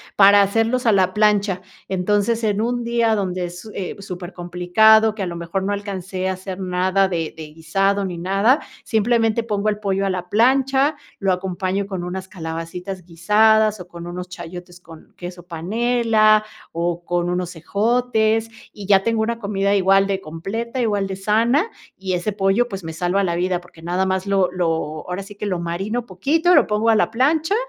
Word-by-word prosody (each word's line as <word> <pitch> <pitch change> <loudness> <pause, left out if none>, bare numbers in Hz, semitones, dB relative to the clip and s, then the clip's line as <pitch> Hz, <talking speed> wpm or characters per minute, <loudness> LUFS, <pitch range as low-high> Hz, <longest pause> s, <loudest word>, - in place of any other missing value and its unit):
para 200 0 +7
hacerlos 225 +5 +1
a - - +6
la 185 -1 +2
plancha. 205 -3 +2 0.3
Entonces, 205 +5 0
en 210 -1 +1
un 240 +1 -1
día 235 -1 +1
donde 185 -3 -1
es 175 +1 -8
su 215 - -11 0.3
supercomplicado, 180 +4 +2
que 210 - -7
a 185 - -1
lo 170 - -5
mejor 170 +3 -3
no 200 +2 -1
alcancé 190 -2 -4
a 190 - 0
hacer 185 0 -7
nada 185 +1 +1
de 165 -3 -2
de 155 -1 -9
guisado 195 +5 0
ni 180 -3 -4
nada, 195 - +2 0.2
simplemente 225 0 +1
pongo 210 -1 -1
el 210 - -1
pollo 195 -1 0
a - - 0
la 180 -1 -3
plancha, 270 +6 +3 0.2
lo 195 -2 +1
acompaño 185 +1 -2
con 190 -3 -5
unas 185 +1 -5
calabacitas 175 +2 -6
guisadas, 215 +5 +3
o 180 - -9
con 170 0 -9
unos 180 +1 -6
chayotes 175 0 -9
con 165 -2 -15
queso 175 -1 -8
panela, 215 +4 +2 0.3
o 170 0 -2
con 175 0 -1
unos 180 -1 -3
ejotes, 220 +4 +1 0.2
y 200 -2 -9
ya 195 -1 +5
tengo 225 0 +1
una 230 +1 -1
comida 200 -2 -2
igual 195 0 +4
de 195 -1 -2
completa, 220 +11 -5
igual 205 -4 0
de 190 - -5
sana. 230 - +2 0.3
Y 190 -1 -3
ese 180 +4 -1
pollo, 200 +4 +1
pues, 195 -3 -6
me 160 - -5
salva 180 +4 0
la 170 -2 -1
vida, 180 0 0
porque 170 -2 -18
nada 180 +3 -1
más 190 0 -1
lo 195 -2 +2
lo 165 -4 -2
ahora 180 +2 -3
sí, 205 +1 -12
que 210 - -5
lo 185 -4 -1
marino 195 +8 -3
poquito, 315 - +2
lo 290 - +6
pongo 215 +2 +1
a 225 - +5
la 215 - +2
plancha 310 - +2
195 Hz, 185 wpm, -21 LUFS, 180-220 Hz, 0.3 s, para